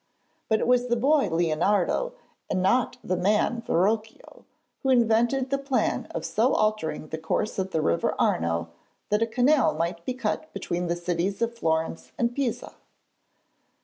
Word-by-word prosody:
But 220 -1 +3
it - - 0
was 250 0 +3
the 240 - +2
boy 280 +5 +3
Leonardo, 175 - +1 0.4
and 185 - 0
not 240 +7 +2
the 185 - -1
man 210 +6 +1
Verrocchio, 215 +3 -1 0.4
who 265 - -1
invented 240 +2 +2
the 275 - +1
plan 275 -2 -1
of - - -5
so 245 +5 +2
altering 160 -8 -1
the 160 - -4
course 160 +6 -2
of 190 0 -1
the 160 -4 -1
river 85 - +1
Arno 85 0 0 0.4
that 210 +1 +1
a 230 - +2
canal 250 - +3
might 170 +1 -2
be 255 - -3
cut 310 +4 -3
between 175 0 -3
the 170 - 0
cities 175 +3 -2
of 235 0 -2
Florence 160 -5 -2
and 235 0 0
Pisa. 270 -5 -2
215 Hz, 160 wpm, -26 LUFS, 170-245 Hz, 0.4 s, But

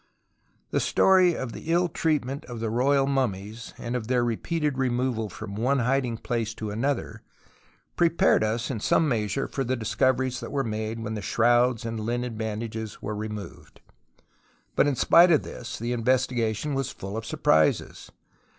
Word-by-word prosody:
The - - +1
story 185 -3 +4
of 130 -3 -4
the 160 - -6
ill 175 +1 +3
treatment 145 -5 -1
of 120 -2 -7
the 110 -1 -2
royal 135 +4 +3
mummies 115 -5 -2
and 120 +1 -4
of 115 -3 -3
their 125 -1 +2
repeated 145 +4 -1
removal 125 -3 0
from 100 +1 -8
one 125 +7 +1
hiding 125 -1 0
place 115 -2 -3
to 110 -1 -5
another 130 +5 -2 0.7
prepared 170 -8 +3
us 115 +4 -1
in 115 - -3
some 160 +8 +2
measure 120 +1 -1
for 135 - -3
the 130 +1 -1
discoveries 125 +3 0
that - - -7
were 140 -1 0
80 120 - -3
TUTANKHAMEN 110 0 -2
made 115 +1 -5
when 110 0 -4
the 105 - -4
shrouds 120 +3 +2
and 115 -1 -3
Hnen 120 +2 -2
bandages 110 0 -4
were 105 - -3
removed. 105 -1 -7 1.0
But - - +4
in 145 - +1
spite 170 +7 +6
of 155 - +4
this 115 - -7
the 120 +2 -2
in 115 -2 -3
vestigation 125 +1 +1
was 135 -2 -1
full 95 +2 -7
of 110 - -3
surprises. 80 -8 +1
120 Hz, 175 wpm, -26 LUFS, 110-135 Hz, 1.0 s, spite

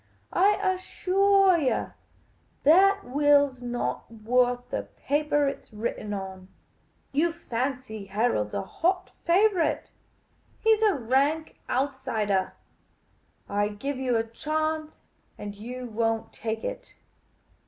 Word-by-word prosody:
I 400 +3 +4
assuah 380 0 +3
you 270 -5 0 0.7
that 390 +7 +5
will 285 +1 +4
's 255 -1 -18
not 245 0 -3
worth 245 +2 +1
the - - -3
paper 295 0 +1
it 275 - -4
's - - -22
written 215 -1 -4
on. 190 -2 -6 0.6
You 315 +5 +2
fancy 255 -7 -4
Harold 195 - 0
's - - -6
a 100 - -1
hot 365 +2 -1
favourite; 370 -1 +2 0.7
he 445 0 +5
's 435 - -9
a 425 -3 +4
rank 280 +6 0
outsidah. 245 -8 0 0.9
I 205 +1 +1
give 255 +7 -4
you 255 -3 +1
a 225 - +1
chance, 310 +6 -3 0.3
and 205 -1 -6
you 245 +5 -7
won't 225 -1 -1
take 220 -1 -4
it. - - -6
265 Hz, 120 wpm, -27 LUFS, 225-325 Hz, 0.9 s, that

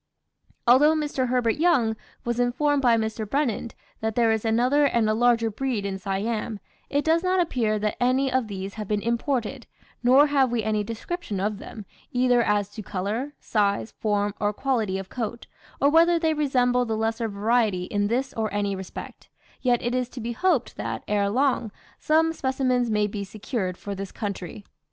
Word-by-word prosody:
Although 290 +6 +6
Mr. 290 -4 -1
Herbert 245 -1 +1
Young 290 -10 +3 0.3
was 240 0 -1
informed 275 +4 +2
by 240 -3 +4
Mr. 220 -1 -3
Brennand 250 -4 -1 0.2
that 220 0 -2
there 230 -2 +3
is 220 -1 0
another 250 +6 +3
and 235 -5 +2
a 215 - +2
larger 230 0 +3
breed 235 -2 -2
in 195 -1 -3
Siam, 210 +3 -2 0.3
it 285 +1 0
does 325 +1 +3
not 370 +1 +1
appear 235 -11 +1
that 210 +2 -2
any 260 +2 +2
of 260 -3 +1
these 195 -1 -5
have 215 -2 -6
been 210 0 -1
imported; 235 0 -1 0.3
nor 260 +4 +6
have 275 -4 +2
we 235 -2 0
any 215 -1 0
description 230 - -5
of 205 +1 -1
them, 215 -3 -9 0.3
either 250 -2 +3
as 205 -3 +1
to 215 - -8
colour, 210 +9 -3
size, 205 0 0
form, 205 -1 0
or 205 0 0
quality 220 -6 0
of 195 -1 -6
coat, 235 -1 -4 0.3
or 280 - +4
whether 335 +2 +5
they 320 -1 +1
resemble 250 -4 +2
the 225 -2 -2
lesser 225 +1 -1
variety 210 -2 +1
in 205 +2 -1
this 260 +5 -1
or 220 -1 -2
any 205 -1 -1
respect, 190 -1 -9 0.3
yet 245 -2 +2
it 240 - -1
is 250 -1 -1
to 255 - -9
be 235 +1 -3
hoped 310 -1 0
that, 110 +2 -4
ere 205 -1 +1
long, 250 -1 +1 0.3
some 320 +1 +2
specimens 260 -4 0
may 210 -1 +2
be 205 0 -4
secured 200 -2 -4
for 200 - -6
this 195 0 -6
country. 200 -2 -5
230 Hz, 185 wpm, -25 LUFS, 210-260 Hz, 0.3 s, Although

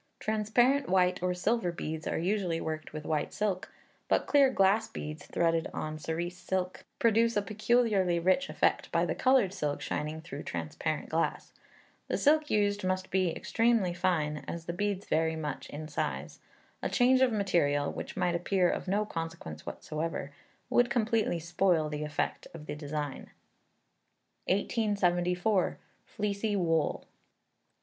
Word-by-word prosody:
Transparent, 240 +6 +2
white, 180 -1 +3
or 180 0 +1
silver 190 0 +1
beads 160 -1 -5
are - - -1
usually 180 -1 0
worked 155 -1 -4
with 155 0 -7
white 155 -2 -1
silk, 200 -3 -2 0.4
but - - +2
clear 280 -2 +5
glass 210 -1 +3
beads, 155 -8 -7
threaded 165 -1 +1
on 155 0 -4
cerise 170 +3 -3
silk, 185 -1 -3
produce 230 0 +3
a - - +3
peculiarly 215 -4 +2
rich 190 +11 +2
effect - - +1
by - - +2
the - - -1
coloured 255 -8 +3
silk 145 -5 -2
shining 155 +1 -3
through 160 -3 -7
transparent 85 - -3
glass. 165 +1 -1 0.5
The - - 0
silk 300 +1 +3
used 205 -1 +1
must 185 0 -1
be 185 -1 +2
extremely 225 0 +1
fine, 170 -4 0
as 170 -1 -5
the 170 - -3
beads 200 +1 -2
vary 160 0 +1
much 150 -2 -5
in 155 +1 -6
size. 145 - -3 0.4
A - - -1
change 255 +1 +4
of 260 -2 +5
material, 155 -9 +1
which - - -7
might 175 -1 +1
appear 180 +1 +2
of - - -4
no 205 +3 +1
consequence 165 - -6
whatever, 155 -2 -4 0.4
would 245 0 +3
completely 225 -5 +1
spoil 170 -1 +1
the 150 0 -3
effect 150 -1 -2
of 155 -2 -9
the - - -4
design. 150 -1 -5 1.2
1874. 185 -2 +1 0.3
Fleecy 205 0 -1
Wool. 165 -4 +1
180 Hz, 145 wpm, -30 LUFS, 160-210 Hz, 1.2 s, clear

